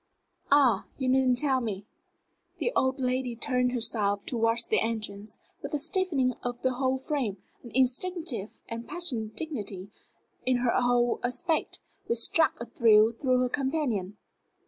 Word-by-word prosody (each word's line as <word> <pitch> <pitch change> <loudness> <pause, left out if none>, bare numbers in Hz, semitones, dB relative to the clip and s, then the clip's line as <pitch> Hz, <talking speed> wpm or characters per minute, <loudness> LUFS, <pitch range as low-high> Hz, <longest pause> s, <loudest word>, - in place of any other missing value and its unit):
Ah, 260 -8 +4
you 260 - -2
needn't 255 -1 +3
tell 265 -1 +2
me." 205 -4 -4 0.7
The 485 - -1
old 260 +1 +1
lady 255 -1 -1
turned 250 0 0
herself 210 -4 0
towards 230 -1 +1
the - - +2
entrance, 215 -2 -3 0.2
with - - -4
a - - +2
stiffening 310 -5 0
of 245 0 -4
the 260 0 +2
whole 260 +1 0
frame, 260 -7 -2 0.2
an 240 - -11
instinctive 260 - 0
and 230 +1 -6
passionate 245 -12 -2
dignity 205 - -4 0.5
in 255 0 +2
her 245 -1 +1
whole 245 -1 +2
aspect, 300 +6 -1 0.3
which 235 - +1
struck 315 +7 +2
a 235 - -5
thrill 225 -1 +5
through 255 +1 +1
her 250 - +1
companion. 260 - -2
250 Hz, 145 wpm, -28 LUFS, 225-265 Hz, 0.7 s, thrill